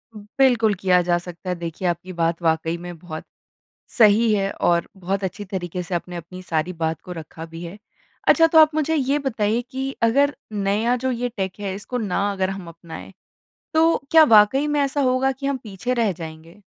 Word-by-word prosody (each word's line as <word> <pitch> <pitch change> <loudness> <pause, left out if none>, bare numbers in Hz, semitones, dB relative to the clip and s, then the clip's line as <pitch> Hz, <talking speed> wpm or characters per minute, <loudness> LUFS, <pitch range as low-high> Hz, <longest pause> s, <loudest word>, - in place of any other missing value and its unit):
बिल्कुल 220 +1 +2
किया 180 -1 +3
जा 175 0 +1
सकता 175 +1 -8
है। 180 - 0
देखिए, 170 +2 -4
आपकी 175 +2 -3
बात 165 0 -1
वाक़ई 165 0 0
में 175 0 -8
बहुत 155 -2 -7 0.8
सही 220 0 +5
है 195 -1 0
और 170 -1 +2
बहुत 190 +1 -3
अच्छी 195 +2 -4
तरीके 180 -2 -4
से 175 +1 -5
आपने 175 +1 -4
अपनी 180 +2 -9
सारी 165 0 -2
बात 160 -2 -2
को 180 - -9
रखा 160 -1 -8
भी 165 +1 -10
है। 175 +5 -8 0.5
अच्छा, 330 - +6
तो 320 0 +4
आप 310 -1 +6
मुझे 310 +1 +1
ये 280 -1 +1
बताइए 230 -5 0
कि 265 0 -3
अगर 280 +5 +3 0.2
नया 210 +4 +1
जो 260 +1 -2
ये 245 0 -2
टेक 190 0 -3
है, 195 -2 -3
इसको 210 +5 -5
ना 205 -2 -1
अगर 190 -1 -1
हम 195 -3 -7
अपनाएँ, 165 +2 -10 0.6
तो 325 +1 +4
क्या 320 -1 +8
वाक़ई 250 +3 +5
में 295 0 0
ऐसा 280 +1 0
होगा 260 0 +2
कि 265 +1 -7
हम 280 -1 0
पीछे 220 +4 -3
रह 230 -5 +1
जाएँगे? 165 +3 -10
195 Hz, 195 wpm, -22 LUFS, 175-250 Hz, 0.8 s, क्या